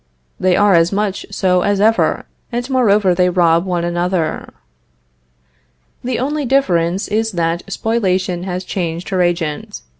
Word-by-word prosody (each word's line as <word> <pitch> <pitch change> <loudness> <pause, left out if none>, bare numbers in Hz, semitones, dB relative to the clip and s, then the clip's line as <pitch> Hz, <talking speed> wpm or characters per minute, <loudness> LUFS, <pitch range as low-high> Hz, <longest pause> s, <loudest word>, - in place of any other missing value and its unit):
They 185 -1 +2
are 205 -1 +4
as 170 0 +4
much 205 -1 -2
so 185 -2 +1
as 200 +1 0
ever, 220 +2 +2 0.3
and 245 +1 -3
moreover 210 -7 +3
they 180 +1 +2
rob 170 -1 +2
one 175 -2 -1
another. 175 -1 -2 1.5
The 250 -1 -2
only 290 +4 -2
difference 190 -9 +1
is 220 +1 -1
that 170 0 -1
Spoliation 185 -6 -1
has 185 0 -4
changed 170 -2 -4
her 185 -2 0
agent. 170 -4 -2
185 Hz, 140 wpm, -17 LUFS, 175-210 Hz, 1.5 s, are